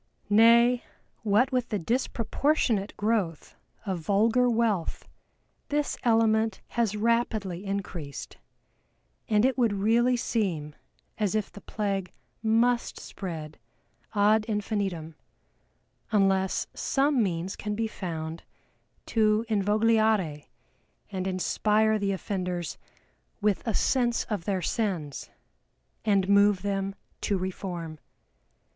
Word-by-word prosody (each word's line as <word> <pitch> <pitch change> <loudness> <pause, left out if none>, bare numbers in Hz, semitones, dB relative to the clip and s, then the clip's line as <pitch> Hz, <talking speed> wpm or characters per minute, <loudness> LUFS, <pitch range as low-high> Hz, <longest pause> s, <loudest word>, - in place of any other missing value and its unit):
Nay, 235 +3 +6 0.4
what 225 +5 +3
with 250 -2 0
the 210 - 0
disproportionate 230 - 0
growth 205 -7 -1 0.3
of 190 -4 -2
vulgar 220 +8 +3
wealth, 225 -7 0 0.6
this 295 0 0
element 225 -1 +3
has 225 -3 0
rapidly 215 -5 0
increased, 185 -7 -5 0.9
and 210 +1 +4
it 260 0 +1
would 230 -4 +3
really 230 +5 +3
seem 175 -11 -1 0.5
as 210 -1 0
if 215 -2 -1
the 205 - -11
plague 195 -4 -3 0.3
must 235 +2 +2
spread 160 -6 -7 0.6
ad 210 +1 +4
infinitum, 200 -6 -2 1.0
unless 195 -2 +2
some 275 -1 +1
means 180 -2 -1
can 210 0 -4
be 225 +1 -1
found 165 -6 -5 0.6
to 215 0 +2
invogliare 215 -6 +2 0.6
and 190 -1 -3
inspire 215 +3 +2
the 200 -1 0
offenders 180 -3 -3 0.6
with 210 -2 +1
a 220 - 0
sense 240 -3 +2
of 200 -6 -2
their 190 -3 -1
sins, 180 - -2 0.7
and 200 -3 +2
move 200 -1 +4
them 195 -1 -2 0.3
to 200 - 0
reform. 180 -4 -5
205 Hz, 105 wpm, -27 LUFS, 190-225 Hz, 1.0 s, Nay